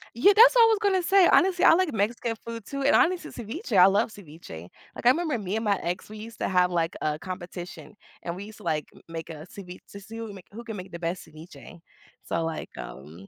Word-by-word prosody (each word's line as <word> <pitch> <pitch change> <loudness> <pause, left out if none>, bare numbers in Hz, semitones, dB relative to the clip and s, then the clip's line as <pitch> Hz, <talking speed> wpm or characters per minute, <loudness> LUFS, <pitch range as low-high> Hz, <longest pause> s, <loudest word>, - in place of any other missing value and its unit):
yeah, 390 - +5
that's 470 +3 +8
what 475 - +7
I - - +8
was 440 -2 +2
gonna 380 -4 +2
say. 385 0 +5
Honestly, 370 -1 +4
I - - +8
like 360 -3 +1
Mexican 225 +2 -1
food 230 -2 -7
too, 275 0 -5
and, 275 +1 +4
honestly, 360 +1 +2
ceviche 240 - -4
I 180 - +9
love 200 +4 +3
ceviche. 155 - -11 0.3
Like, - - -9
I - - +8
remember 310 -1 +1
me 200 0 -4
and 225 - -2
my 200 -2 +2
ex, 180 +3 -4
we 215 - -9
used 220 +1 -10
to - - -1
have, 180 -1 +3
like, 165 -1 -1
a 155 0 -1
competition, 180 0 -8 0.3
and 170 -1 -4
we 195 +2 -7
used 215 0 -12
to, 215 - -15
like, 155 -3 -1
m - - -17
make 165 0 -7
a 155 -1 -8
cevi 180 -2 -9
to 200 - -9
see 220 +3 -10
who 230 - -5
can 205 - -9
make 190 - -13
who 230 +4 -9
can 225 -2 -7
make 185 -1 -9
the 170 - -7
best 170 +1 -4
ceviche. 160 +2 -13 0.4
So, 165 - -2
like, 160 -1 -5
um 80 +8 -10
200 Hz, 255 wpm, -26 LUFS, 170-240 Hz, 0.4 s, I